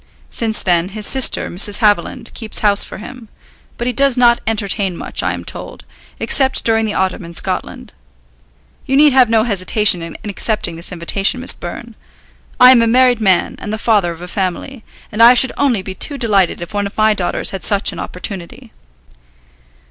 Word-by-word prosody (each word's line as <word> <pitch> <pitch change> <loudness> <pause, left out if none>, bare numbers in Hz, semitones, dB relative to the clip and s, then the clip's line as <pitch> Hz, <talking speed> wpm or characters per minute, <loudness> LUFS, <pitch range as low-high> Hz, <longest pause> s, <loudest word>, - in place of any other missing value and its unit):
Since 220 -2 -1
then, 175 0 +1
his 210 +1 -4
sister, 265 +3 +2
Mrs. 200 +3 0
Haviland, 210 0 0
keeps 220 -2 -1
house 205 -1 +3
for - - -10
him; 235 0 -11 0.5
but 235 - -4
he 250 - -1
does 275 0 +2
not 240 -1 +4
entertain 200 -4 -2
much, - - -3
I - - -1
am - - -8
told, - - -6 0.3
except 265 -1 0
during 225 -1 +2
the 210 - -4
autumn 190 -1 -2
in 170 0 -11
Scotland. - - -3 0.9
You 270 0 +1
need 295 -1 +5
have 255 -3 +4
no 225 -1 +2
hesitation 205 -3 +2
in 165 0 -8
accepting 205 -3 -2
this 165 +1 -3
invitation, 195 +7 -1
Miss 255 - +3
Byrne. 235 +7 -9 0.7
I 250 0 +8
am 245 -2 +5
a 230 - +2
married 250 0 +3
man, 190 -4 +1
and 210 - -7
the 215 - -3
father 210 -6 +1
of 170 +1 -10
a - - -8
family, 195 +7 -4 0.3
and 215 - -2
I 240 +2 +8
should 255 +1 +4
only 245 -9 0
be 190 - -7
too 285 +8 -1
delighted 200 -8 0
if 190 - -11
one 205 -1 -2
of 200 - -14
my 215 0 +3
daughters 185 -4 -2
had 195 - -6
such 200 -2 +1
an - - -9
opportunity." 195 +6 -7
215 Hz, 190 wpm, -15 LUFS, 190-240 Hz, 0.9 s, I